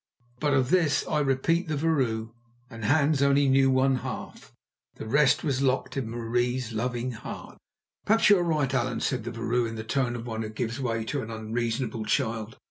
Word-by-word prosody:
But 145 -2 +1
of 130 +1 +1
this 170 -5 +3
I 155 - 0
repeat 150 +5 +1
the 155 - -1
vrouw 130 -8 0 0.4
and 115 -1 -6
Hans 145 +2 +3
only 140 0 +4
knew 135 0 +4
one 130 0 +3
half; - - -7 0.4
the - - -8
rest 140 +4 +3
was 135 -3 0
locked 130 -1 0
in 130 -5 -2
Marie's 120 +1 -1
loving 120 +2 -2
heart. 110 - -9 0.5
"Perhaps 220 0 +5
you 200 - +7
are - - +1
right, 150 -6 0
Allan," 125 -2 0
said 125 -4 -1
the 120 - -4
vrouw 115 +1 0
in 115 - -6
the 110 - -5
tone 120 +1 -1
of 120 0 -6
one 110 -2 -4
who 110 - -4
gives 115 +3 -4
way 115 -4 -1
to 140 +4 -2
an 110 - -7
unreasonable 115 +1 -3
child. 110 0 -1
125 Hz, 195 wpm, -27 LUFS, 115-140 Hz, 0.5 s, you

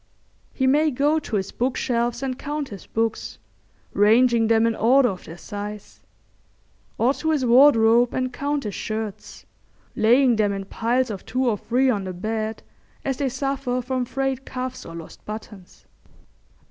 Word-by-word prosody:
He 265 - -1
may 295 +4 +4
go 290 +3 +1
to 265 -7 -5
his 195 -1 -2
bookshelves 240 0 -1
and 260 -1 -3
count 295 -1 -4
his 200 -3 -10
books, 220 - -2 0.6
ranging 225 +3 +4
them 225 0 +3
in 230 -1 +1
order 250 +3 +4
of 185 -3 -7
their 165 - -10
size; 205 +1 -8 1.0
or 245 +4 +3
to 320 - -3
his 295 -5 +1
wardrobe 240 -2 +5
and 255 -1 -2
count 285 +2 -2
his 210 -2 -4
shirts, 215 -1 -6 0.5
laying 240 +2 +4
them 205 -2 +2
in 195 0 -5
piles 240 +4 0
of 195 - -7
two 255 0 -1
or 215 -4 +1
three 255 +3 +2
on 200 -4 -2
the 185 - -5
bed, 220 +4 -3 0.4
as 270 -2 -1
they 275 -2 0
suffer 270 -1 -2
from 255 0 -2
frayed 270 +1 -2
cuffs 255 -1 -6
or 165 - -9
lost 165 -1 -11
buttons. 210 -3 -10
240 Hz, 160 wpm, -23 LUFS, 215-265 Hz, 1.0 s, wardrobe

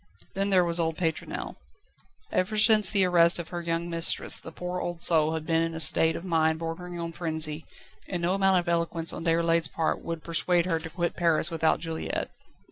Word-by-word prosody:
Then 195 +1 -1
there 185 -2 +4
was 170 0 +2
old 165 -1 -1
Pétronelle. 160 - -4 0.7
Ever 200 +4 -1
since 215 -2 +6
the 200 -3 +4
arrest 170 -1 +4
of 170 -2 -6
her 175 -1 -5
young 170 0 -2
mistress 165 -1 +3
the 160 - -10
poor 180 +2 -5
old 175 -1 -4
soul 160 -1 +2
had 160 -1 -5
been 165 0 +1
in 165 0 -2
a - - -5
state 160 0 +2
of 175 - -7
mind 160 -2 +1
bordering 170 +2 -6
on 170 0 -4
frenzy, 160 -2 -2 0.4
and 175 -2 -4
no 175 +2 +1
amount 195 -1 +3
of 175 - -2
eloquence 170 -1 0
on - - -6
Déroulède's 165 -1 +2
part 160 +1 -2
would 165 -1 -6
persuade 170 +1 0
her 165 -3 -1
to 165 - -8
quit 170 +1 -3
Paris 170 -1 +1
without 160 -1 +1
Juliette. 165 -1 -4
170 Hz, 205 wpm, -26 LUFS, 165-180 Hz, 0.7 s, since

